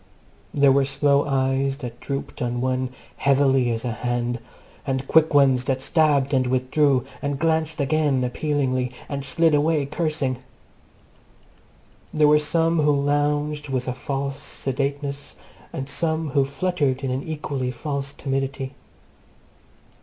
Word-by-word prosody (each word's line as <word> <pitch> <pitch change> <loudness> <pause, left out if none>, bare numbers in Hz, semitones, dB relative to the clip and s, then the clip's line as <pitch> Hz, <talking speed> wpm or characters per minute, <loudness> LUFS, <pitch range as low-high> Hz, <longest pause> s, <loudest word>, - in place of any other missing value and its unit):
There 140 -1 +4
were 140 +1 +4
slow 140 +1 +2
eyes 135 0 +1
that 120 -4 -7
drooped 140 -3 -5
on 120 0 -1
one 130 0 0 0.3
heavily 135 -2 +3
as 115 +1 -2
a 120 - -1
hand, 120 +1 -2 0.4
and 135 0 -2
quick 160 0 +4
ones 135 -3 +4
that 130 0 -1
stabbed 145 -3 +2
and 130 -1 +2
withdrew, 130 +1 +2 0.2
and 140 -1 -2
glanced 160 0 0
again 140 -2 +1
appealingly, 130 -1 -1 0.2
and 140 -1 -4
slid 165 +3 +2
away 150 0 +2
cursing. 150 -3 -1 1.7
There 150 -1 +4
were 150 0 +6
some 165 +2 +1
who 145 -1 +3
lounged 145 +1 0
with 130 -1 -2
a 125 - -1
false 140 +1 -4
sedateness, 140 +1 -3 0.4
and 135 - -5
some 160 +1 -1
who 135 0 +2
fluttered 140 -3 -1
in 130 - -1
an 130 +1 -1
equally 145 -5 -3
false 140 +2 -4
timidity. 135 0 -3
140 Hz, 135 wpm, -23 LUFS, 130-150 Hz, 1.7 s, were